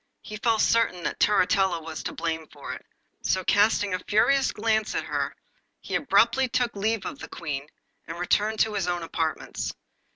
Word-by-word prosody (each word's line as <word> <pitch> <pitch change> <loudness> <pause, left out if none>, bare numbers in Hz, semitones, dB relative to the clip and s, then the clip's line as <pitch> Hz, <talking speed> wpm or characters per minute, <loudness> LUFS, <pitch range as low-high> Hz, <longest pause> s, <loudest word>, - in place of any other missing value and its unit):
He 215 - -7
felt 225 0 +2
certain 225 -6 +2
that - - -3
Turritella 190 -3 +3
was 160 -1 -7
to - - -4
blame 160 -1 -3
for 145 -1 -8
it, - - -9 0.4
so 185 - 0
casting 205 0 +3
a 185 - 0
furious 265 +8 +3
glance 220 0 0
at - - 0
her - - -2 0.4
he - - -8
abruptly 245 +2 +3
took 245 -1 0
leave 215 +1 -1
of 285 - -5
the - - -8
Queen, 145 -4 -5 0.4
and 165 +1 -6
returned 210 +5 +1
to 220 - +2
his 200 -3 -1
own 175 -1 -1
apartments. 165 -1 -3
205 Hz, 175 wpm, -26 LUFS, 170-225 Hz, 0.4 s, Turritella